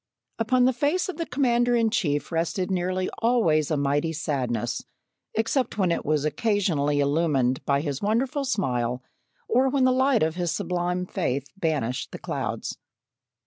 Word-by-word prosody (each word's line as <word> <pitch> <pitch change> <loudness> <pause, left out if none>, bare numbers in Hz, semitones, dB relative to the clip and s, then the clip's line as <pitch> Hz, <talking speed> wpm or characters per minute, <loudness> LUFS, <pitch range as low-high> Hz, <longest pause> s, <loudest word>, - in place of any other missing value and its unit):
Upon 245 +2 +3
the 260 - +3
face 305 +9 0
of 370 - -5
the 335 - -3
Commander 245 -2 +2
in 225 -2 +2
chief 150 -11 0
rested 175 +3 -1
nearly 185 0 0
always 215 - +2
a 155 - +1
mighty 145 +3 0
sadness, 125 -7 -2 0.5
except 225 +2 0
when 185 -4 +2
it - - -1
was 150 -1 0
occasionally 155 -6 +1
illumined 140 -3 +1
by 140 0 +2
his 145 -3 -3
wonderful 250 +7 0
smile, 125 - -1 0.4
or 260 +2 +3
when 270 0 +1
the 255 - +5
light 260 - +3
of 160 0 +1
his 175 -1 -1
sublime 180 0 -1
faith 135 -5 -2
banished 150 - -1
the - - -6
clouds. - - -4
180 Hz, 155 wpm, -25 LUFS, 145-235 Hz, 0.5 s, the